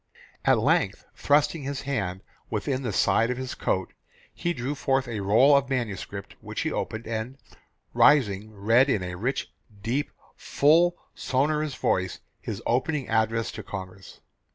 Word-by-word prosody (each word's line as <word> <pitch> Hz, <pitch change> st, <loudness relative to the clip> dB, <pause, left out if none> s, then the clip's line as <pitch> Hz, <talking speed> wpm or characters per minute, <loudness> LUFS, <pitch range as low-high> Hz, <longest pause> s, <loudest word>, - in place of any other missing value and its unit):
"At -, -, +5 dB
length -, -, +1 dB
thrusting 150 Hz, +2 st, +2 dB
his 140 Hz, 0 st, -4 dB
hand 95 Hz, -10 st, -2 dB, 0.3 s
within 130 Hz, +5 st, -1 dB
the 120 Hz, -5 st, -2 dB
side 115 Hz, +4 st, +2 dB
of 125 Hz, -, -2 dB
his 130 Hz, -1 st, -4 dB
coat, 95 Hz, -1 st, -2 dB, 0.4 s
he 175 Hz, -, -2 dB
drew 135 Hz, -2 st, -3 dB
forth 135 Hz, -2 st, 0 dB
a 115 Hz, -3 st, -4 dB
roll 110 Hz, +9 st, +5 dB
of 140 Hz, -1 st, +2 dB
manuscript 105 Hz, -6 st, -4 dB
which -, -, -5 dB
he -, -, -1 dB
opened, 110 Hz, +1 st, -3 dB
and 115 Hz, +4 st, -4 dB, 0.6 s
rising 110 Hz, -8 st, +4 dB
read 115 Hz, +6 st, +3 dB
in 105 Hz, -8 st, +1 dB
a 90 Hz, 0 st, -4 dB
rich, 120 Hz, +10 st, -3 dB, 0.3 s
deep, 130 Hz, +5 st, -1 dB, 0.3 s
full, 170 Hz, +5 st, +3 dB, 0.2 s
sonorous 150 Hz, +2 st, 0 dB
voice 95 Hz, -1 st, 0 dB, 0.2 s
his 110 Hz, 0 st, -6 dB
opening 135 Hz, +3 st, 0 dB
address 110 Hz, 0 st, +1 dB
to -, -, -7 dB
Congress. 95 Hz, -1 st, -9 dB
120 Hz, 150 wpm, -26 LUFS, 105-140 Hz, 0.6 s, At